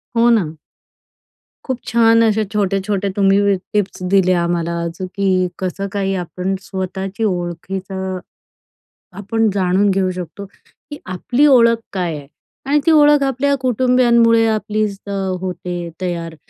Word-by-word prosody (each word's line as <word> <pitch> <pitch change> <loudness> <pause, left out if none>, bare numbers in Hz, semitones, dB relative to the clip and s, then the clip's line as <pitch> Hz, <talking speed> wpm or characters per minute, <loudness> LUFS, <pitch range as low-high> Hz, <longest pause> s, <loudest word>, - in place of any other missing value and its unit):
हो, 235 +1 +4
ना. 175 -10 +1 1.1
खूप 260 -2 -3
छान 230 -1 +4
असे 220 -1 +2
छोटे-छोटे 200 0 0
तुम्ही 195 -1 +3
वी 200 -1 +3 0.2
टिप्स 205 -2 -1
दिले 185 -2 +4
आम्हाला 170 0 -1
आज, 170 +2 -6
की 185 -1 0
कसं 190 +2 -3
काही 195 -1 -1
आपण 180 +1 -3
स्वतःची 190 +2 -5
ओळखीचा, 190 +1 -3 1.0
आपण 220 +2 0
जाणून 190 +1 +2
घेऊ 190 -1 +1
शकतो, 180 +2 -7
की 290 +8 -15
आपली 240 +10 0
ओळख 235 -4 +5 0.2
काय 175 -4 -2
आहे. 140 -1 -11 0.4
आणि 290 +2 +2
ती 330 - +5
ओळख 295 -2 +5
आपल्या 275 +1 +1
कुटुंबीयांमुळे 240 -2 +3
आपलीच 215 -2 -1
अ, - - -4 0.3
होते 180 -2 -5
तयार 170 -2 -4
195 Hz, 130 wpm, -18 LUFS, 185-230 Hz, 1.1 s, ओळख